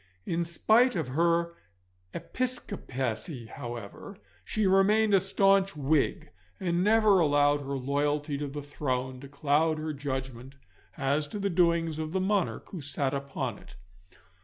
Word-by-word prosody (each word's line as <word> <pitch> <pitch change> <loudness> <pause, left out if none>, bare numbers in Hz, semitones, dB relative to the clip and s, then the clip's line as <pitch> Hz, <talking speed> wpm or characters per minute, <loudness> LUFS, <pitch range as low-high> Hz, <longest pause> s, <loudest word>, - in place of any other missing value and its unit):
In 170 0 -1
spite 225 +9 +3
of 160 -7 -2
her 170 +4 +1 0.6
Episcopacy, 135 - -4
however, 120 - -8 0.3
she 215 -1 -1
remained 205 +3 +4
a 195 - +7
staunch 195 0 +2
Whig, 145 0 0 0.3
and 175 -1 0
never 215 -2 +5
allowed 145 -2 +3
her 140 0 -3
loyalty 145 +2 -1
to 145 - -3
the 145 +1 -6
throne 130 -3 -3
to 140 - -10
cloud 150 +3 +1
her 155 0 -3
judgment 130 -2 -5 0.4
as 145 +2 0
to 210 - -6
the 200 -1 -1
doings 170 -2 +2
of 155 +1 -4
the 190 - +1
monarch 195 0 0
who 180 - -7
sat 140 -1 -2
upon 135 -5 -4
it. - - -15
155 Hz, 140 wpm, -28 LUFS, 140-190 Hz, 0.6 s, a